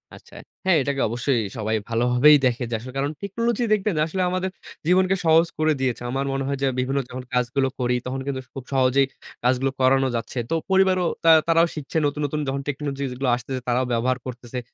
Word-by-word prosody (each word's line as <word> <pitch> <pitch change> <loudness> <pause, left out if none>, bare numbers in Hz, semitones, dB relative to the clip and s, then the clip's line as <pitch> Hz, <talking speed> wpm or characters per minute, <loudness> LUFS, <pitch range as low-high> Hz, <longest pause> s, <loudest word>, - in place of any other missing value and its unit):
আচ্ছা। - - -17 0.3
হ্যাঁ, 190 -2 +4
এইটাকে 140 0 -1
অবশ্যই 120 +1 0 0.2
সবাই 110 0 -1
ভালোভাবেই 125 +6 +5
দেখে। 125 0 +1
যে - - 0
আসলে 130 +2 -9
কারণ 140 +2 0
টেকনোলজি 230 +4 -1
দেখবেন 210 -3 0
আসলে 185 +3 -3
আমাদের 185 +1 -1 0.4
জীবনকে 185 +1 +4
সহজ 165 +1 +5
করে 155 0 +3
দিয়েছে। 125 -3 -1
আমার 135 +1 -1
মনে 135 0 -1
হয় 140 -1 -1
যে 135 - +3
বিভিন্ন 135 +2 0
যখন 125 0 -6
কাজগুলো 125 +2 +1
করি, 125 0 +1
তখন 130 +1 -3
কিন্তু 130 -2 -2
খুব 135 - -7
সহজেই 135 +1 +3 0.4
কাজগুলো 130 +2 +2
করানো 135 +1 +4
যাচ্ছে। 115 +2 -4
তো - - -1 0.2
পরিবারও 190 -2 +3 0.2
তা 165 - +5 0.2
তারাও 165 +1 +4
শিখছে 155 +1 -4
নতুন, 145 +1 -1
নতুন 150 +2 -2
যখন 135 +1 -2
টেকনোলজি 140 -1 -3
যেগুলো 125 +1 -2
আসতেছে, 130 +2 -5
তারাও 125 +1 +1
ব্যবহার 125 +2 +1
করতেছে। 125 0 -6
135 Hz, 190 wpm, -23 LUFS, 125-160 Hz, 0.4 s, ভালোভাবেই